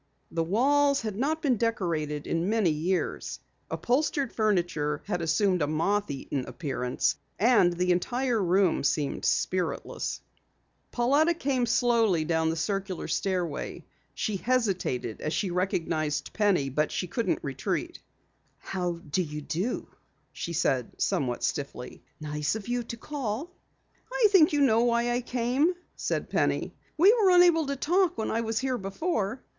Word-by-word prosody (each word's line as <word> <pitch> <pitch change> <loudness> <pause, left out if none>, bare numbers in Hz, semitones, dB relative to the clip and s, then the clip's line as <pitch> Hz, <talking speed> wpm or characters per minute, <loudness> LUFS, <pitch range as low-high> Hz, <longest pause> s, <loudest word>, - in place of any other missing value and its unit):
The 165 - 0
walls 280 - +3
had 215 -3 -4
not 300 +8 -1
been 260 -5 +2
decorated 165 -10 -1
in 165 +3 -1
many 215 -6 +2
years, 170 +5 -2 0.3
upholstered 275 +1 0
furniture 175 -9 0
had 180 -4 -2
assumed 180 +3 +2
a 145 - +2
moth 195 +7 0
eaten 135 -1 -3
appearance, 130 -5 -1 0.2
and 210 -6 +4
the 180 +1 +1
entire 240 +5 0
room 185 0 +2
seemed 145 0 0
spiritless. 180 -3 -1 0.7
Pauletta 285 +8 +3
came 265 -6 0
slowly 225 -9 +2
down 160 0 +1
the 165 - -1
circular 195 +2 -2
stairway. 175 -2 -2 0.3
She 210 -2 -1
hesitated 190 - -1
as 155 - -2
she 195 -4 -1
recognized 160 -5 -1
Penny, 195 -10 +2
but 150 +3 0 0.2
could 230 +3 -1
not - - 0
retreat. - - -3 0.6
"How 180 -2 -3
do 170 0 -2
you 150 -3 -5
do," 180 - -2 0.5
she 170 - -5
said 130 -6 0
somewhat 125 -3 0
stiffly. 140 -3 -4 0.2
"Nice 150 +3 -2
of 220 -1 -6
you 245 0 0
to 235 - -6
call." 275 +3 -4 0.6
"I - - +4
think 340 -6 +6
you 295 -1 +1
know 230 -4 +4
why 235 0 +2
I 245 +1 0
came," 255 +8 +1 0.2
said - - -3
Penny. - - 0 0.2
"We 380 +7 +7
were 435 -6 +4
unable 350 -4 +5
to 280 - -1
talk 350 +5 +1
when 220 - -2
I 230 - 0
was 225 -1 -2
here 260 0 -1
before." 210 - -2
205 Hz, 145 wpm, -28 LUFS, 165-250 Hz, 0.7 s, We